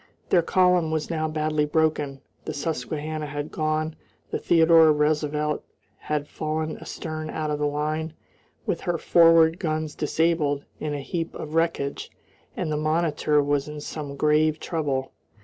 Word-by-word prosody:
Their 175 Hz, -, +6 dB
column 180 Hz, -1 st, +3 dB
was 155 Hz, +1 st, -2 dB
now 155 Hz, -1 st, 0 dB
badly 155 Hz, -1 st, 0 dB
broken, 150 Hz, -3 st, 0 dB, 0.2 s
the 155 Hz, -, -4 dB
Susquehanna 155 Hz, +1 st, -3 dB
had 145 Hz, +1 st, -5 dB
gone, 155 Hz, 0 st, -1 dB, 0.4 s
the -, -, -1 dB
Theodore 165 Hz, -1 st, +6 dB
Roosevelt 150 Hz, 0 st, 0 dB, 0.3 s
had 150 Hz, -1 st, -3 dB
fallen 155 Hz, +1 st, -3 dB
astern 155 Hz, -1 st, -6 dB
out 155 Hz, -1 st, -2 dB
of 150 Hz, -, -2 dB
the 150 Hz, -, +1 dB
line, 155 Hz, +2 st, -2 dB, 0.5 s
with -, -, -1 dB
her 175 Hz, -1 st, -1 dB
forward 165 Hz, 0 st, +5 dB
guns 155 Hz, -2 st, -2 dB
disabled, 150 Hz, -2 st, 0 dB
in 150 Hz, -1 st, -2 dB
a 145 Hz, -, -4 dB
heap 165 Hz, +3 st, -4 dB
of 150 Hz, -, -7 dB
wreckage, 165 Hz, -4 st, -1 dB, 0.5 s
and 155 Hz, -, -2 dB
the 150 Hz, -, 0 dB
Monitor 155 Hz, -1 st, +1 dB
was 145 Hz, 0 st, 0 dB
in 150 Hz, 0 st, -6 dB
some 145 Hz, -1 st, -6 dB
grave 155 Hz, +2 st, +2 dB
trouble. 140 Hz, -6 st, -2 dB
155 Hz, 150 wpm, -25 LUFS, 150-160 Hz, 0.5 s, Their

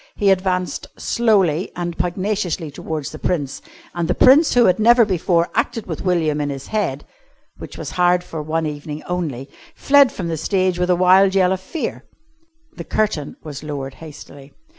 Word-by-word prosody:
He 200 Hz, -2 st, +3 dB
advanced 185 Hz, -1 st, -1 dB
slowly 195 Hz, -8 st, +1 dB
and 175 Hz, -1 st, -4 dB
pugnaciously 180 Hz, -2 st, -2 dB
towards 150 Hz, 0 st, -5 dB
the 155 Hz, -, -9 dB
Prince; 145 Hz, -7 st, -2 dB, 0.3 s
and 170 Hz, -1 st, -2 dB
the -, -, 0 dB
Prince, 280 Hz, +4 st, +5 dB
who 240 Hz, -1 st, +6 dB
had 185 Hz, -, +3 dB
never 235 Hz, +1 st, +6 dB
before 175 Hz, -3 st, 0 dB
acted 230 Hz, 0 st, -1 dB
with -, -, -5 dB
William 160 Hz, -5 st, 0 dB
in 145 Hz, -, -2 dB
his 135 Hz, -1 st, -6 dB
head 195 Hz, -10 st, -2 dB, 0.5 s
(which -, -, -9 dB
was -, -, -6 dB
hired 180 Hz, 0 st, +2 dB
for 165 Hz, -3 st, -6 dB
one 160 Hz, +2 st, -2 dB
evening 150 Hz, 0 st, -6 dB
only) 155 Hz, -8 st, -4 dB, 0.3 s
fled 280 Hz, -2 st, +4 dB
from 180 Hz, -, -5 dB
the 165 Hz, -1 st, -2 dB
stage 185 Hz, +1 st, 0 dB
with 180 Hz, 0 st, 0 dB
a 180 Hz, -, +4 dB
wild 190 Hz, +2 st, +4 dB
yell 185 Hz, -1 st, +3 dB
of 190 Hz, 0 st, -2 dB
fear. 300 Hz, -, -5 dB, 0.7 s
The -, -, -5 dB
curtain 205 Hz, -9 st, -2 dB
was 145 Hz, -3 st, -8 dB
lowered 140 Hz, -3 st, -5 dB
hastily. 145 Hz, -2 st, -13 dB
180 Hz, 175 wpm, -20 LUFS, 155-195 Hz, 0.7 s, who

